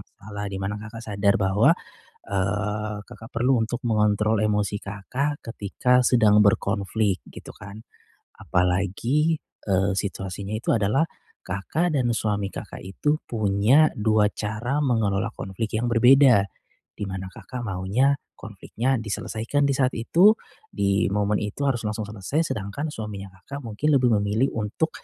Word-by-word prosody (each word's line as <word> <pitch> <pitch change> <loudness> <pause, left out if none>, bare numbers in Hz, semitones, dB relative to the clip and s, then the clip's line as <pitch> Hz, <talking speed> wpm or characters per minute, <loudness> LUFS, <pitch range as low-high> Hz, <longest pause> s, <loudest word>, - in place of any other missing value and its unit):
salah, 105 0 -6
di 100 - -5
mana 95 +2 -3
Kakak 110 +2 -9
sadar 100 -2 +1
bahwa, 105 - +3 0.5
eee, 105 +2 -2
Kakak 110 +2 -12
perlu 125 +1 +3
untuk 120 +3 -2
mengontrol 105 -1 +2
emosi 105 -1 0
Kakak 125 +9 -3
ketika 115 +3 +1
sedang 110 -4 +5
berkonflik 100 -1 +1 0.2
gitu - - -9
kan. 105 +1 -11 0.5
Apalagi, 100 - +1 0.2
eee, 95 0 +1
situasinya 100 0 -4
itu - - -10
adalah 110 +10 +1 0.3
Kakak 150 - -1
dan 120 -2 +1
suami 105 -3 -1
Kakak - - -8
itu 145 +11 0
punya 110 +7 +3
2 105 -1 +3
cara 120 +9 -2
mengelola 110 -3 0
konflik 105 +3 -5
yang 120 - -1
berbeda. 125 -2 +6 0.5
Di 105 - -3
mana 95 0 -5
Kakak 125 +5 -8
maunya 100 +7 +1 0.2
konfliknya 115 +4 -3
diselesaikan 110 +5 -2
di - - +1
saat 130 -1 +1
itu, 175 - +5 0.3
di 100 - +1
momen 105 +1 +1
itu 105 +7 -4
harus 120 -5 0
langsung 105 +1 -2
selesai, 110 - -2
sedangkan 110 +9 -4
suaminya 100 -5 -7
Kakak 140 +5 -7
mungkin 130 +7 0
lebih 125 -2 +3
memilih 105 +6 +1
untuk, 110 +9 -1
105 Hz, 135 wpm, -24 LUFS, 100-125 Hz, 0.5 s, berbeda